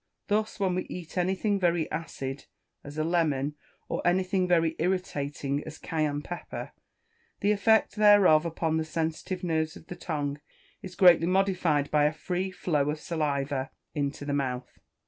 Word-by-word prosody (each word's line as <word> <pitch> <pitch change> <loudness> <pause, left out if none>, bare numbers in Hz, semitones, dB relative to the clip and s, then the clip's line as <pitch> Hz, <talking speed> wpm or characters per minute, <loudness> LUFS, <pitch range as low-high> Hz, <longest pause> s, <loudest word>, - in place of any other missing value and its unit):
Thus, 215 +1 0
when 190 -2 +1
we 185 - -2
eat 175 -2 -8
anything 190 +3 +1
very 170 -3 +2
acid, 135 -4 -5 0.4
as 145 +1 -9
a 155 - +1
lemon, 155 -4 +1 0.3
or - - -2
anything 185 +1 +2
very 165 -2 +2
irritating, 145 -5 -1
as 155 0 -9
Cayenne 150 -2 -2
pepper, 175 +3 -6 0.7
the 205 - +3
effect 220 +2 +3
thereof 205 -7 +6
upon 165 -1 -1
the 160 - 0
sensitive 160 +3 -3
nerves 160 -2 0
of - - -13
the 180 - -7
tongue 145 -4 -3 0.4
is 185 -4 -9
greatly 175 -3 +6
modified 180 -6 +1
by 150 -1 +4
a 150 - +2
free 180 +4 -2
flow 150 -6 0
of 150 +1 -2
saliva 140 -5 -1 0.2
into 145 -1 -2
the 145 - -2
mouth. 125 -3 -3
165 Hz, 155 wpm, -28 LUFS, 145-185 Hz, 0.7 s, thereof